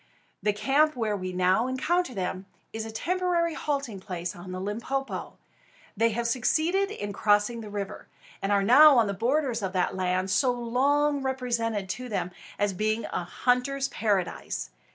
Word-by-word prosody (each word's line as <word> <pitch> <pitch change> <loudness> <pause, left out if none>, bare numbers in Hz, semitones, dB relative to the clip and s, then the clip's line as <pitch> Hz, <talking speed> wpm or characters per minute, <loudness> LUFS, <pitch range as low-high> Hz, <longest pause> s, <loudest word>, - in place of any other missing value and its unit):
The 210 - +2
camp 275 +9 +2
where 220 -4 -1
we 185 -2 -4
now 185 +6 +2
encounter 265 +3 0
them 185 0 -3 0.3
is 220 0 -4
a - - -7
temporary 345 +5 0
halting 280 -9 -3
place 180 -2 -5
on 180 +1 -9
the 185 - -4
Limpopo. 230 +8 -4 0.6
They 225 +2 +3
have 235 +2 -2
succeeded 315 - +1
in 205 - -5
crossing 210 +3 +2
the 215 - -8
river, 200 -1 -5 0.3
and 195 - -1
are 200 -1 +3
now 275 +6 +8
on 230 - +5
the 200 - -2
borders 245 +3 0
of 190 -1 -3
that 180 0 0
land 185 0 0
so 250 +7 +3
long 275 +5 +1
represented 235 -6 -1
to 250 +5 -4
them 185 -4 -2 0.3
as 205 -1 +1
being 215 +3 -1
a - - -1
hunter's 260 +7 0
paradise. 195 - -2
225 Hz, 165 wpm, -27 LUFS, 195-270 Hz, 0.6 s, now